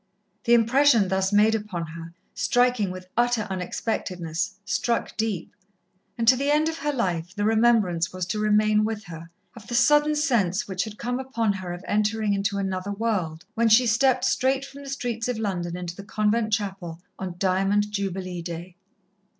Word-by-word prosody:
The 235 -1 +6
impression 235 -2 +4
thus 190 +1 +1
made 210 +2 +4
upon 205 -6 -3
her, 165 +1 -10 0.2
striking 245 -5 +2
with 185 0 -8
utter 240 -2 +2
unexpectedness, 180 -3 -3
struck 235 +3 -1
deep, 215 -6 -3 0.6
and 230 -1 -1
to 255 - +8
the 280 +3 -1
end 300 +2 +3
of 325 0 -3
her 295 - -1
life 180 - -2
the 205 - -2
remembrance 220 -7 +3
was 185 -1 -3
to 210 +4 -3
remain 215 0 +3
with 215 -1 -3
her, 165 -3 -10 0.3
of 225 -3 -12
the 240 - -3
sudden 295 +4 +4
sense 240 - +1
which 190 0 -2
had 215 -1 -9
come 245 +3 -2
upon 230 -5 -1
her 185 -2 -6
of 175 +2 -7
entering 210 0 +1
into 200 0 -1
another 190 0 -2
world, 195 -7 -2
when 230 0 +2
she 235 +3 +6
stepped 255 +2 +3
straight 265 +1 +1
from 280 +1 -11
the 280 - -9
streets 240 -4 -3
of 250 -2 -2
London 180 -5 -3
into 175 -1 -6
the 200 - -9
convent 215 +2 0
chapel, 195 -6 -3 0.2
on 185 -2 -5
Diamond 195 +2 +1
Jubilee 190 -3 -3
Day. 170 +1 -7
210 Hz, 175 wpm, -25 LUFS, 185-235 Hz, 0.6 s, to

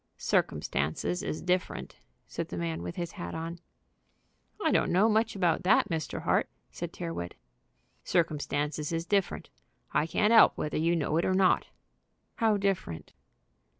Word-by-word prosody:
"Circumstances 80 - 0
is 160 - -4
different," 180 +1 -1 0.3
said - - -5
the 90 - -6
man 85 -1 -2
with 85 0 -5
his 170 -1 -4
hat 85 - -6
on. 165 +2 -5 1.0
"I - - +1
don't - - +2
know 190 +5 +4
much 220 0 +2
about 180 -3 +2
that, 185 +3 +3
Mr. 160 -4 -3
Hart," - - +2 0.2
said - - -5
Tyrrwhit. 85 +1 -5 0.7
"Circumstances 150 -2 -1
is 165 0 -2
different. 200 -1 -1 0.4
I 150 - +1
can't 210 +6 +2
'elp 225 - +7
whether 150 - -2
you 165 +2 +2
know 155 -1 0
it 170 - +2
or 185 - +2
not." 190 -1 +3 0.7
"How 220 -2 +3
different?" 195 - -2
170 Hz, 150 wpm, -29 LUFS, 145-190 Hz, 1.0 s, elp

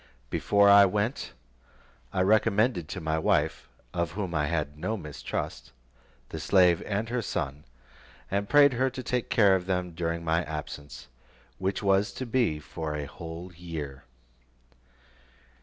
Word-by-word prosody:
Before 100 -1 +3
I 100 0 +9
went, 105 +7 -2 0.8
I 95 - 0
recommended 105 -2 +2
to 95 - -4
my 80 -1 -1
wife, 80 -4 0 0.2
of 85 -1 -1
whom 95 -3 -3
I 75 -2 +1
had 75 -2 -2
no 95 +9 -2
mistrust, 75 -4 -5 0.6
the 80 - -6
slave 90 0 +4
and 105 +2 -1
her 125 0 -1
son, 75 -7 -4 0.7
and 100 +1 -1
prayed 145 -2 +6
her 130 +2 +1
to 130 0 -7
take 125 0 -2
care 100 -4 +5
of 90 -1 -3
them 90 -2 -1
during 85 0 -3
my 85 +2 +2
absence, 75 -3 -7 0.5
which 95 +2 -1
was 100 +1 +3
to 130 - -5
be 115 -9 +1
for 75 0 -5
a 75 -1 -3
whole 85 +4 -8
year. 75 -6 -7
90 Hz, 145 wpm, -28 LUFS, 80-105 Hz, 0.8 s, I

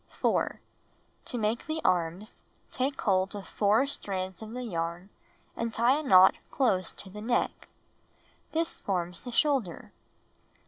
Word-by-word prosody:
4. - - 0 0.7
To 245 - -3
make 220 +4 -1
the 315 0 -2
arms, 180 +3 0 0.3
take 270 +2 -1
hold 190 -1 +1
of 200 -2 -7
4 215 +5 +3
strands 190 -8 -4
of 220 - -7
the 250 0 -4
yarn 170 -2 -4 0.4
and 230 0 -2
tie 240 +6 +3
a - - -3
knot 190 -10 +7 0.2
close 195 -9 +1
to 190 - -9
the 210 +2 -8
neck. 235 +2 -1 0.8
This 330 +1 -1
forms 180 -3 -2
the 245 - -7
shoulder. 255 - 0
210 Hz, 140 wpm, -29 LUFS, 185-250 Hz, 0.8 s, knot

